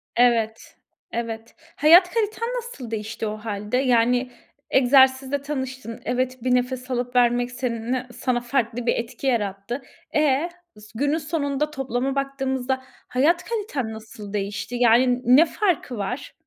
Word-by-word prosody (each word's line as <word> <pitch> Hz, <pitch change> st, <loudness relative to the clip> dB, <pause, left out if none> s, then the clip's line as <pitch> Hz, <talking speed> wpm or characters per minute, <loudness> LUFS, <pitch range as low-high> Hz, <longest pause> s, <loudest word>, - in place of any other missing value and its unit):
Evet, 230 Hz, -2 st, +2 dB, 0.4 s
evet. 230 Hz, -1 st, -5 dB, 0.2 s
Hayat 345 Hz, +5 st, +7 dB
kaliten 450 Hz, 0 st, -1 dB
nasıl 460 Hz, -, -7 dB
değişti 220 Hz, 0 st, -4 dB
o 215 Hz, 0 st, -4 dB
hâlde? 210 Hz, +2 st, -3 dB
Yani, 250 Hz, 0 st, +2 dB, 0.4 s
egzersizle 265 Hz, +1 st, +4 dB
tanıştın. 260 Hz, -5 st, -5 dB
Evet, 255 Hz, 0 st, -1 dB
bir 250 Hz, -1 st, +3 dB
nefes 250 Hz, +1 st, -2 dB
alıp 245 Hz, 0 st, -2 dB
vermek 245 Hz, 0 st, +3 dB
seninle 245 Hz, 0 st, -2 dB
sana 240 Hz, 0 st, -1 dB
farklı 245 Hz, -1 st, -1 dB
bir -, -, +2 dB
etki 240 Hz, +3 st, -4 dB
yarattı. 210 Hz, +1 st, -1 dB, 0.3 s
E? 300 Hz, +2 st, +2 dB, 0.5 s
Günün 285 Hz, +6 st, +1 dB
sonunda 300 Hz, -2 st, -1 dB
toplama 270 Hz, 0 st, -2 dB
baktığımızda 265 Hz, -1 st, -1 dB, 0.3 s
hayat 325 Hz, +8 st, +2 dB
kaliten 355 Hz, -, -3 dB
nasıl 215 Hz, -2 st, -10 dB
değişti? 205 Hz, +3 st, -3 dB
Yani 240 Hz, +1 st, +5 dB
n 250 Hz, -, -11 dB
ne 315 Hz, +5 st, +7 dB
farkı 340 Hz, -, -1 dB
var? 245 Hz, +7 st, -4 dB
250 Hz, 130 wpm, -23 LUFS, 235-275 Hz, 0.5 s, Hayat